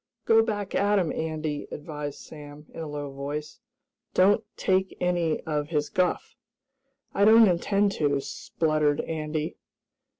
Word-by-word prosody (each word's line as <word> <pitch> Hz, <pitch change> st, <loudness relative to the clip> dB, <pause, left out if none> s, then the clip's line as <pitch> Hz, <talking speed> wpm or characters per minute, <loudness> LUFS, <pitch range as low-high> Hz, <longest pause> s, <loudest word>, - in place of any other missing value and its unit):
"Go 225 Hz, 0 st, +6 dB
back 205 Hz, -3 st, -3 dB
at 205 Hz, +1 st, +2 dB
him, 180 Hz, -5 st, +1 dB
Andy," 155 Hz, -2 st, -3 dB
advised 150 Hz, -1 st, -6 dB
Sam, 150 Hz, -1 st, -11 dB
in -, -, -9 dB
a 160 Hz, -, -4 dB
low 145 Hz, -1 st, -5 dB
voice. 145 Hz, -, -6 dB, 0.6 s
"Don't 200 Hz, +4 st, +4 dB
take 190 Hz, 0 st, 0 dB
any 175 Hz, -3 st, 0 dB
of 150 Hz, -2 st, -2 dB
his 150 Hz, -2 st, -1 dB
guff!" 180 Hz, +4 st, -1 dB, 0.8 s
"I 200 Hz, -, +2 dB
don't 220 Hz, +1 st, +8 dB
intend 200 Hz, +3 st, +2 dB
to," 145 Hz, -2 st, +1 dB
spluttered 155 Hz, +1 st, 0 dB
Andy. 155 Hz, -1 st, -3 dB
160 Hz, 135 wpm, -26 LUFS, 150-190 Hz, 0.8 s, don't